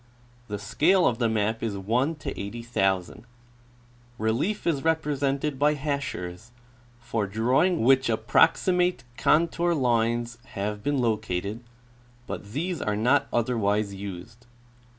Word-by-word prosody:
The 105 - -4
scale 175 - +2
of 115 -1 +1
the 115 -2 +2
map 110 0 0
is 110 -3 -2
1:80,000. 115 - -2 0.9
Relief 120 - -1
is 150 -5 0
represented 145 -3 0
by 150 +1 +3
hachures, 125 -9 -4 0.5
for 115 -3 -2
drawing 125 - +2
which 130 +2 +4
approxi 115 +11 +3
mate 180 -3 +1
contour 170 +4 +2
lines 120 -2 0 0.2
have 105 +1 -3
been 145 +5 0
located, 110 -3 -1 0.7
but 100 - -7
these 170 +3 -2
are 105 -1 -1
not 130 +6 +3
otherwise 105 -4 0
used. 100 +4 -9
120 Hz, 110 wpm, -26 LUFS, 105-145 Hz, 0.9 s, which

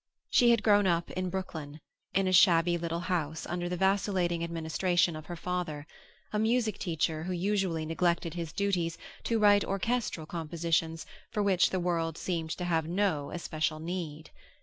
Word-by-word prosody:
She 240 -2 +5
had 230 -2 +4
grown 205 -2 +5
up 170 -1 0
in 185 0 -2
Brooklyn, 160 -5 -5 0.4
in 195 0 +3
a 185 - +1
shabby 175 -2 +5
little 170 0 -2
house 165 -4 -2
under 175 0 -3
the 180 - -2
vacillating 190 -3 +1
administration 170 +1 +1
of 155 0 -9
her 175 - -5
father, 170 -4 -3 0.5
a 210 - +1
music 225 0 +1
teacher 160 -2 -1
who 185 - -2
usually 180 -3 0
neglected 170 0 0
his 170 -3 -4
duties 180 -4 -1 0.3
to 230 - +1
write 205 -1 +5
orchestral 195 -4 -1
compositions 165 0 -1 0.2
for 210 -2 -1
which 190 -3 +3
the 185 - -1
world 165 -2 -1
seemed 165 -3 -2
to 180 - -4
have 165 -2 0
no 175 -5 0
especial 155 -2 -2
need. 160 -2 -5
175 Hz, 165 wpm, -30 LUFS, 165-190 Hz, 0.5 s, She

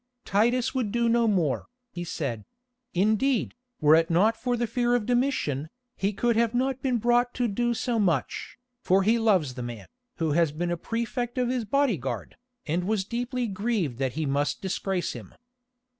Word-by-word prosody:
"Titus 240 +5 +2
would 250 -6 -1
do 235 +1 +1
no 230 0 +3
more," 170 -10 +1 0.2
he 175 - -5
said; 140 -10 -4 0.5
"indeed, 220 +6 +2 0.3
were 150 -1 +5
it 165 +1 +4
not 200 +7 +3
for 245 +1 -1
the 240 - 0
fear 240 +1 +1
of 235 -4 0
Domitian, 240 - 0 0.3
he 195 +1 0
could 235 +3 +1
have 230 +1 +2
not 260 +1 +1
have - - -38
been 255 -2 +1
brought 240 +2 +2
to 245 -1 +1
do 240 +3 0
so 235 0 -1
much, 170 - -1 0.2
for 190 +1 +3
he 225 +4 +3
loves 190 - +2
the 125 - -6
man, 120 -3 -6 0.3
who 160 -2 -1
has 165 0 +3
been 175 +3 -2
a - - +1
prefect 235 +6 -3
of 250 -1 +1
his 250 -3 -1
bodyguard, 210 - -1 0.3
and 170 +4 -1
was 205 -1 0
deeply 245 +3 -2
grieved 200 - -1
that 130 -2 -1
he 155 +1 -2
must 145 +1 0
disgrace 190 -1 -2
him. - - -10
215 Hz, 185 wpm, -27 LUFS, 165-240 Hz, 0.5 s, were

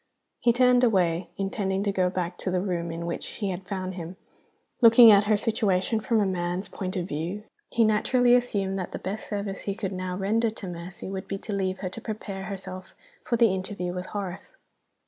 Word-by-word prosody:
He 240 - +4
turned 250 +1 +4
away, 180 -6 +2
intending 195 0 -1
to 205 - +1
go 185 -2 +1
back 180 -1 -3
to - - -2
the 185 0 +1
room 175 -3 -2
in 165 +1 -5
which 170 - -3
she 205 -3 -4
had 185 +1 -5
found 185 -2 -3
him. 175 0 -7 0.7
Looking 230 0 +9
at 205 0 +6
her 210 0 +3
situation 215 -1 +1
from 225 +1 +1
a 205 - +3
man's 180 0 -2
point 185 +1 -5
of 175 -1 -2
view, 175 +7 -4 0.3
he 235 - +3
naturally 240 +3 +3
assumed 200 -6 +1
that 185 - -5
the - - -2
best 200 +3 -5
service 200 -2 -3
he 195 - -1
could 200 -2 -3
now 185 0 -3
render 220 +4 +1
to 215 -3 -8
Mercy 175 +1 -7
would 190 0 -5
be 195 - -3
to 205 +1 -6
leave 190 -1 -1
her 185 - -2
to 230 - -7
prepare 200 -3 -5
herself 185 -1 -7 0.3
for 235 - 0
the 230 -4 +4
interview 185 -1 -3
with 180 0 -5
Horace. 195 -3 -6
195 Hz, 205 wpm, -26 LUFS, 185-215 Hz, 0.7 s, Looking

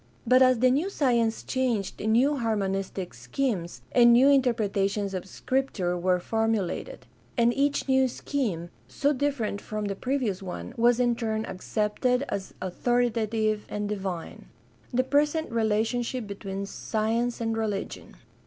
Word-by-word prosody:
But 255 +1 +5
as 255 -1 +6
the 255 +2 +4
new 300 +9 +1
science 235 - +1
changed 240 -7 -1
new 245 +7 +3
harmonistic 195 -5 -2
schemes 170 - -3
and 240 -1 +6
new 255 +4 +6
interpretations 205 -7 +1
of 185 0 -4
Scripture 210 -7 -1
were 180 +1 +1
formulated; 225 - -2 0.3
and 235 0 +4
each 285 +2 0
new 265 0 +4
scheme, 215 - -3 0.2
so 280 - +1
different 260 -7 -1
from 215 -1 -4
the 200 -1 -2
previous 250 -5 -1
one, 190 +5 -6
was 240 0 +3
in 240 -1 +3
turn 220 -2 -2
accepted 220 +7 -1
as 195 -1 -4
authoritative 220 +1 0
and 210 0 -3
divine. 190 -5 -5 0.4
The 255 +1 +2
present 295 +2 +1
relationship 230 +2 0
between 200 -1 -5
science 225 +4 -1
and 225 -1 -1
religion. 210 -3 -4
225 Hz, 135 wpm, -27 LUFS, 200-255 Hz, 0.4 s, as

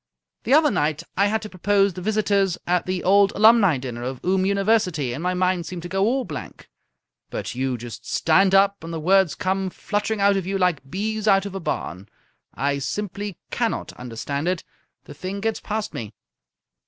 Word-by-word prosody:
The 260 - +2
other 305 -2 +5
night 150 0 0
I 200 +1 +3
had 220 +2 -1
to 210 - -6
propose 200 +1 +2
the 180 - -7
Visitors 200 -2 +1
at 180 0 0
the 185 -1 -2
Old 200 +1 +5
Alumni 215 - +5
dinner 125 -2 -6
of 130 +1 -4
Oom 190 +1 +2
University, 195 - +1
and 140 - -5
my 180 +1 0
mind 180 -2 0
seemed 175 0 -6
to - - -5
go 195 +2 0
all 255 +3 +1
blank. 150 -6 -8 0.6
But - - -4
you 130 0 -1
just 120 +1 -8
stand 190 +4 +3
up 200 -1 +3
and 165 - -6
the 165 - -3
words 190 +1 +3
come 190 0 -1
fluttering 210 +3 -2
out 200 0 +4
of 185 -2 -3
you 195 0 0
like 175 -8 0
bees 215 +5 -2
out 195 -1 +4
of 200 - -6
a 195 - -4
barn. 100 - -4 0.5
I 140 0 0
simply 205 +4 -4
cannot - - -2
understand 125 +5 -4
it. 180 -1 -1 0.4
The - - -11
thing 190 +2 -5
gets 220 +1 -1
past 215 -1 -4
me." 110 -2 -6
185 Hz, 190 wpm, -23 LUFS, 155-200 Hz, 0.6 s, other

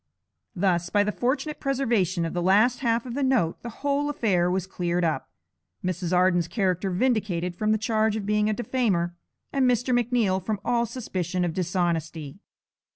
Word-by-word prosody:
Thus 175 -2 +1
by 205 +1 +3
the 210 - -1
fortunate 280 +7 -2
preservation 225 - 0
of 165 - -4
the 175 - -1
last 210 +7 +4
half 230 -2 0
of 245 - -6
the 285 - -2
note 255 -12 +1
the 240 - -6 0.2
whole 285 +1 +1
affair 195 -11 +1
was 185 0 -1
cleared 175 -2 -1
up, 160 -2 -1 0.6
Mrs. 180 -1 -2
Arden's 180 -2 +3
character 185 +1 0
vindicated 185 -4 0
from 215 +3 0
the 215 - +3
charge 220 -1 +1
of 215 -2 -3
being 210 +1 +2
a - - +1
defamer, 205 -8 0 0.4
and 265 -2 +3
Mr. 245 +1 +1
McNeal 230 -6 +1
from 210 0 -2
all 235 -1 +1
suspicion 185 -7 -2
of 170 - -2
dishonesty. 170 -3 -2
200 Hz, 170 wpm, -26 LUFS, 175-240 Hz, 0.6 s, last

